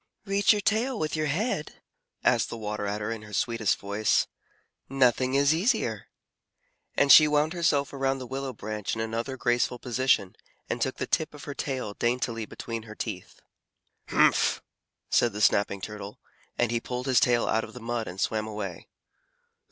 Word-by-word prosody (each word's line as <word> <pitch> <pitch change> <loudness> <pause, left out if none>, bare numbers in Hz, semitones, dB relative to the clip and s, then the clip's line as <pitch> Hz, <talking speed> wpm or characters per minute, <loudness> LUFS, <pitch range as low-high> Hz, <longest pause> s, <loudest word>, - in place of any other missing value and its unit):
"Reach 200 0 +3
your 210 -1 +2
tail 225 +5 +1
with 155 -3 -2
your 155 0 0
head?" 160 - -2 0.5
asked - - +3
the - - -6
Water 105 -1 -3
Adder 105 +2 -2
in 115 -1 -5
her 105 -1 -12
sweetest 115 0 +1
voice. 100 +2 +1 0.6
"Nothing 130 0 +2
is 140 +2 +4
easier." 185 +11 0 0.9
And 140 -1 +4
she 155 +3 +10
wound 150 +2 +2
herself 150 -6 +1
around 135 0 0
the 130 - -7
willow 135 +1 -4
branch 105 -2 -4
in - - -6
another 115 +4 -3
graceful 120 0 +1
position, 125 -5 +1 0.3
and - - -3
took - - 0
the - - -2
tip 155 -1 -1
of 145 - -11
her 145 - -5
tail 130 -7 -3
daintily 120 -1 -1
between 115 -1 -6
her 110 - -9
teeth. - - -6 0.7
"Humph!" - - +3 0.5
said 120 -3 +3
the 105 - -5
Snapping 100 -1 +2
Turtle, 105 +1 -7 0.4
and 120 -1 +1
he 120 - +1
pulled 125 +1 -4
his 130 -2 +4
tail 120 -1 +3
out 110 +1 +1
of - - -9
the 125 - -9
mud 115 -1 -3
and 90 - -7
swam 110 +2 0
away. 100 -5 -6
120 Hz, 175 wpm, -27 LUFS, 110-140 Hz, 0.9 s, she